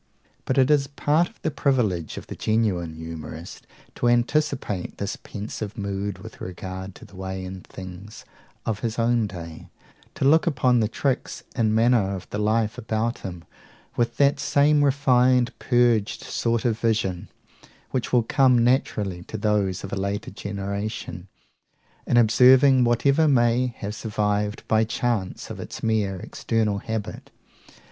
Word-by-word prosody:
But 130 - -1
it 135 +2 +4
is 140 -2 +3
part 150 +4 +1
of 225 - -26
the 160 - 0
privilege 115 - 0
of - - -7
the - - -8
genuine 100 -7 0
humourist 80 +1 -8 0.3
to 120 - -1
anticipate 120 -4 0
this 100 - -3
pensive 105 0 -7
mood 100 0 -3
with - - -12
regard 95 +1 -6
to - - -13
the 100 - -17
ways 95 0 -5
and 95 0 -8
things 95 +3 -10 0.4
of 110 -2 -1
his 115 -1 -3
own 115 -1 +2
day; 85 -4 -9 0.5
to - - -1
look 160 +5 +5
upon 130 -5 +3
the 110 - +2
tricks 130 +4 -2
in 110 -3 +2
manner 110 -4 +3
of 95 - -8
the 105 - -3
life 110 +2 +1
about 115 0 -2
him 90 -3 -7 0.5
with 120 0 0
that 140 0 +3
same 145 +1 +3
refined, 130 -3 +3
purged 120 -4 +2
sort 115 -1 -1
of 115 -2 +1
vision, 105 -6 -1 0.6
which 130 -3 -2
will 125 -2 +4
come 125 0 +4
naturally 105 -7 0
to - - -6
those 100 -3 0
of 95 - -6
a - - +1
later 100 +2 -3
generation, 100 -2 -5 0.8
in 120 - +3
observing 125 +3 +6
whatever 140 +6 +3
may 125 -2 +3
have 105 +1 -5
survived 105 -1 -2
by 110 0 +3
chance 115 -3 -2
of - - -7
its - - -8
mere 110 -4 +1
external 105 +2 -1
habit. 110 -1 -5
110 Hz, 150 wpm, -24 LUFS, 100-125 Hz, 0.8 s, observing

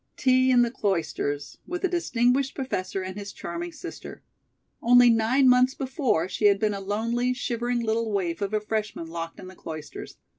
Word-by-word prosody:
Tea 255 0 +3
in 245 -1 +5
the 235 - -1
Cloisters, 160 - -2
with 355 +2 -4
a - - +4
distinguished 270 -6 +1
professor 190 -8 -3
and 185 0 -6
his 200 0 -7
charming 345 +1 -6
sister! 335 +2 -9 0.6
Only 245 0 +6
nine 230 +4 +3
months 255 +1 +5
before 260 - 0
she 210 - -2
had 200 -1 +6
been 210 +1 0
a 200 - -4
lonely, 230 +5 -1
shivering 240 -1 -2
little 225 0 0
waif 180 -4 -1
of 200 0 -1
a 215 - +1
freshman 215 -4 -3
locked 165 0 -6
in - - -9
the 185 - -12
Cloisters. 155 -3 -8
230 Hz, 180 wpm, -26 LUFS, 195-255 Hz, 0.6 s, Only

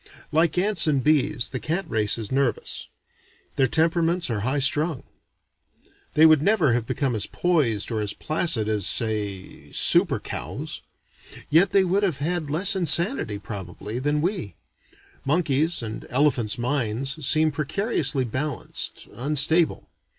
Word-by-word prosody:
Like 160 +1 +1
ants 195 -2 +4
and 140 -4 +1
bees, 145 -5 +1
the 130 - -3
cat 165 +6 -3
race 110 -6 0
is 110 -3 -6
nervous. 135 -2 -2 0.7
Their 135 - +2
temperaments 165 0 +1
are 110 - -2
high 130 +7 -1
strung. 145 +1 +1 1.1
They 155 - +6
would 155 -3 +5
never 170 - +2
have 115 -1 -2
become 135 -3 -1
as 105 - -2
poised 140 - 0
or 110 -2 -2
as 105 -1 -2
placid 155 -8 0
as 105 -3 0
say 105 -4 -2
super - - +3
cows. - - -6 0.7
Yet 170 +6 +4
they 195 +1 +3
would 190 +2 0
have 185 -9 -1
had 160 +1 -3
less 185 +7 +4
insanity, 170 - +3
probably, 100 +2 -7
than 145 +2 -1
we. 165 - -3 0.7
Monkeys' 155 0 0
(and 110 -1 -7
elephants') 125 -5 +1
minds 135 +3 -2
seem 155 +3 +3
precariously 155 - -1
balanced, 130 +4 -2
unstable. 150 +7 +1
145 Hz, 135 wpm, -23 LUFS, 115-165 Hz, 1.1 s, They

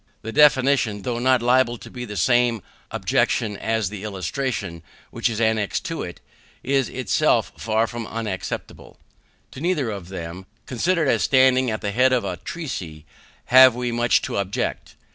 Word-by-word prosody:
The 115 - -5
definition, 130 -6 +3
though 120 -2 -2
not 130 -1 +2
liable 125 -1 +3
to - - -12
the 125 -5 -7
same 120 +3 +2 0.3
objection 105 -3 0
as 110 -2 -1
the 105 -1 -8
illustration 100 - -4 0.3
which - - -1
is 110 -1 -4
annexed 110 -2 0
to 165 - -4
it, 90 - -7 0.4
is 135 -1 +1
itself 125 -7 +1
far 110 0 0
from 115 -1 -6
unexceptionable. 110 -5 -6 0.5
To 130 - -10
neither 155 -9 0
of 95 -4 -7
them, 90 0 -7 0.2
considered 165 +5 0
as - - +2
standing 130 -1 +4
at 110 - -3
the 105 - -2
head 130 +4 +3
of 125 - +1
a - - -3
treatise, 95 - -6 0.4
have 130 -1 +7
we 125 -1 -2
much 120 0 +2
to - - -3
object. 100 0 -3
115 Hz, 160 wpm, -22 LUFS, 105-130 Hz, 0.5 s, have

